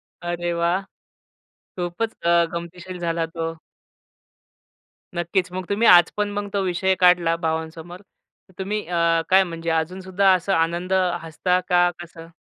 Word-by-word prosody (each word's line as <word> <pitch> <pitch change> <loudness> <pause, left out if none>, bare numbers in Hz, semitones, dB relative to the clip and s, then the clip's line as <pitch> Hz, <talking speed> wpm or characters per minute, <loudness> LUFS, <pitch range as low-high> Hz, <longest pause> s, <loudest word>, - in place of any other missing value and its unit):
अरे 175 0 -5
वाह! 170 +2 +1 1.0
खूपचं 175 +1 -2
अ, - - +2
गमतीशीर 175 +2 -7
झाला 165 -1 -1
तो. 165 0 -4 1.6
नक्कीचं. 180 +1 -1
मग 185 - -4
तुम्ही 215 +3 +2
आज 175 -1 +7
पण 210 0 0
मग 205 0 -4
तो 200 - +1
विषय 190 +1 +1
काढला 175 -2 +4
भावांसमोर, 160 +2 -4
तर 190 -1 -31
तुम्ही 210 +2 -3
अ, 170 -1 +2
काय 190 +1 +6
म्हणजे 165 -1 -5
अजूनसुद्धा 185 +4 +1
असा 185 +1 0
आनंद 175 +3 -1 0.3
हसता 180 +3 0
का 175 0 +4
कसं? 165 -1 -11
175 Hz, 135 wpm, -22 LUFS, 170-185 Hz, 1.6 s, आज